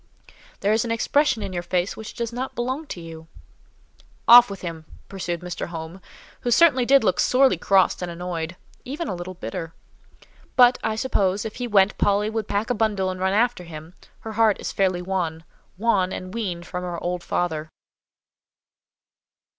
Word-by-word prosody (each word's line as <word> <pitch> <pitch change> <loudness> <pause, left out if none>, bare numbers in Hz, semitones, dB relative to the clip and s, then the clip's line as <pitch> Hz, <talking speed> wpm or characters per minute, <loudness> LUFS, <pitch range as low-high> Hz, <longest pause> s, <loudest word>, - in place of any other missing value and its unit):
There 205 +2 +2
is 220 - +2
an 235 - -4
expression 255 +2 +1
in 190 - -5
your 175 - -2
face 180 +1 -1
which 220 -1 -9
does 235 0 -3
not 255 +2 -4
belong 260 +6 -3
to 180 - -6
you." 165 -1 -10 1.0
"Off 240 0 +9
with 200 -1 -7
him!" 165 -3 -6 0.2
pursued 175 -3 -4
Mr. 180 0 -5
Home, 165 +2 -8 0.4
who 245 - -3
certainly 255 -2 +5
did 275 -1 +6
look 185 -4 +1
sorely 260 -3 +4
crossed 190 +3 +2
and 180 - -3
annoyed—even 180 - -6
a - - -2
little 180 +1 -7
bitter; 165 +2 -6 0.8
"but, 250 0 +6
I 220 -1 0
suppose, 200 -4 0
if 220 - -6
he 245 - -3
went, 200 -2 +3
Polly 205 +1 +2
would 220 -2 -3
pack 210 +4 -1
a - - +3
bundle 205 -4 0
and 185 - -7
run 190 +1 +1
after 220 -3 +1
him; 160 0 -10 0.3
her 225 - -6
heart 220 -1 +3
is - - -4
fairly 185 -2 0
won—won, 185 +3 -2
and 185 0 -6
weaned 185 -7 -3
from 180 0 -5
her 175 -1 -4
old 175 0 -2
father." 160 -3 -2
195 Hz, 170 wpm, -23 LUFS, 175-230 Hz, 1.0 s, Off